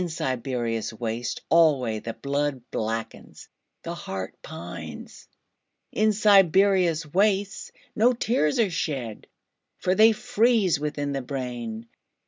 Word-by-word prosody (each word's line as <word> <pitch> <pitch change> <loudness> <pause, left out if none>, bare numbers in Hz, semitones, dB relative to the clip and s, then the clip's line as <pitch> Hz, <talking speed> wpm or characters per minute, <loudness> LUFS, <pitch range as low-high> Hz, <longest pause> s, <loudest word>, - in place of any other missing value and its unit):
In 180 - -2
Siberia's 120 -6 -2
wastes 115 +1 -4
alwayThe 125 -9 +2
blood 140 -2 -1
blackens, 115 +1 -5 0.4
the 170 - -4
heart 95 - -6
pines.In 215 - -6
Siberia's 195 -4 +4
wastesNo 205 +6 0
tears 220 - +1
are 215 -5 +2
shed, 135 -9 -4 0.5
For 185 - 0
they 220 +3 +6
freeze 225 - +2
within 145 -1 -3
the 135 -1 -2
brain. 120 -4 -5
150 Hz, 100 wpm, -25 LUFS, 120-195 Hz, 0.5 s, they